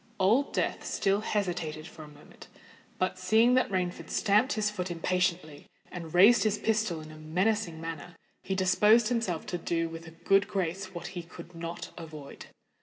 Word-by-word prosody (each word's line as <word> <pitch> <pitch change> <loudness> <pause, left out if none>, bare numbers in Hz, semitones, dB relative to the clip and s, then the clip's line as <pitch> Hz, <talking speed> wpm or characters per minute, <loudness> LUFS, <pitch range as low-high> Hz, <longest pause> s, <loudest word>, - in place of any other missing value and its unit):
Old 225 +9 +3
Death - - -1
still 200 +1 0
hesitated 175 -8 -2
for 160 - -12
a 155 - -10
moment; 150 0 -15 0.5
but, 185 0 -1
seeing 220 +6 +4
that 255 - +3
Rainford 185 -2 -2
stamped 215 +5 +2
his 210 -1 0
foot 185 -3 -4
impatiently 170 -3 -1 0.2
and 170 -3 -7
raised 200 +8 +7
his 215 -1 +1
pistol 215 -8 0
in 155 0 -11
a 155 - -12
menacing 175 +3 -1
manner, 165 +1 -7 0.3
he 190 - -3
disposed 210 +5 +4
himself 225 -9 -1
to 175 - -4
do 165 0 -1
with 165 +1 -9
a 165 0 -13
good 195 +1 +4
grace 190 0 -3
what 170 0 -6
he 175 - -4
could 170 +1 -12
not 165 0 -6
avoid. 155 -4 -10
180 Hz, 175 wpm, -29 LUFS, 165-205 Hz, 0.5 s, raised